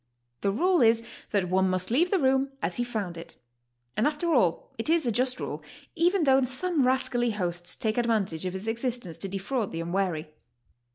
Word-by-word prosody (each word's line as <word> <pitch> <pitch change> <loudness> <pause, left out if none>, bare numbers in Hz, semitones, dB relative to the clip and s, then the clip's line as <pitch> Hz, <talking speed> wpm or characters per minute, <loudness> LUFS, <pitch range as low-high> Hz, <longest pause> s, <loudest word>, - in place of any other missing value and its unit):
The 200 - +1
rule 350 - +2
is 230 0 +4 0.3
that 200 -3 0
one 190 +1 +2
must 185 +2 -1
leave 330 +9 +3
the 390 - +2
room 270 -2 +2
as - - -2
he 245 - +1
found 205 -8 -4
it, 165 0 -10 0.6
and 220 - +2
after 310 +3 0
all 185 - +1
it 225 - 0
is 330 -3 +3
a 240 - +1
just 250 +3 0
rule, - - -5 0.3
even 350 +1 +2
though 270 -2 +5
some 265 +3 +1
rascally 245 -2 +1
hosts 175 -4 -1
take 220 +1 -1
advantage 200 -8 0
of 180 - -4
its 190 +2 -6
existence 230 -5 -2
to 195 - -2
defraud 200 +4 -2
the 165 - -4
unwary. 170 -3 -2
230 Hz, 190 wpm, -27 LUFS, 185-265 Hz, 0.6 s, though